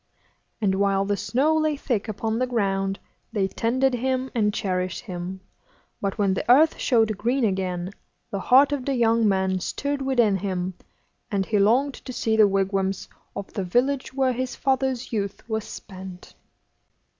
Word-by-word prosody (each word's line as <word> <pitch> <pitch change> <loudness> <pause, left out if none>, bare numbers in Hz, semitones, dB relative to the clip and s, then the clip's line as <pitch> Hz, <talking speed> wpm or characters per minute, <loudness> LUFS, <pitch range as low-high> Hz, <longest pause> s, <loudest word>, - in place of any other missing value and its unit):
And 195 -3 +2
while 195 0 +2
the 205 0 0
snow 275 +10 +1
lay 310 -1 +1
thick 235 -7 -2
upon 220 +1 -2
the 255 - +1
ground, 195 -4 0 0.3
they 200 -4 +1
tended 255 +6 +1
him 260 +1 -1
and 210 -3 +2
cherished 185 -3 -2
him; 185 -2 -6 0.6
but 200 0 -2
when 200 -3 +2
the 235 - +1
earth 310 +5 +5
showed 220 -5 +2
green 250 +4 +1
again, 185 -2 -2 0.4
the 200 - -2
heart 270 +7 +5
of 285 -3 -1
the 275 - 0
young 230 -2 +3
man 190 -1 +1
stirred 280 +9 -3
within 240 -7 +2
him, 185 -1 -2 0.6
and 200 -3 0
he 210 +1 +1
longed 250 +8 +3
to 255 - -9
see 220 -2 0
the 215 -1 +6
wigwams 195 0 0 0.3
of 200 - -6
the 195 - -2
village 255 +9 0
where 260 -1 +1
his 255 +1 -3
father's 265 -2 -1
youth 200 -1 -3
was 220 -2 -2
spent. 185 -2 -10
215 Hz, 165 wpm, -24 LUFS, 195-255 Hz, 0.6 s, the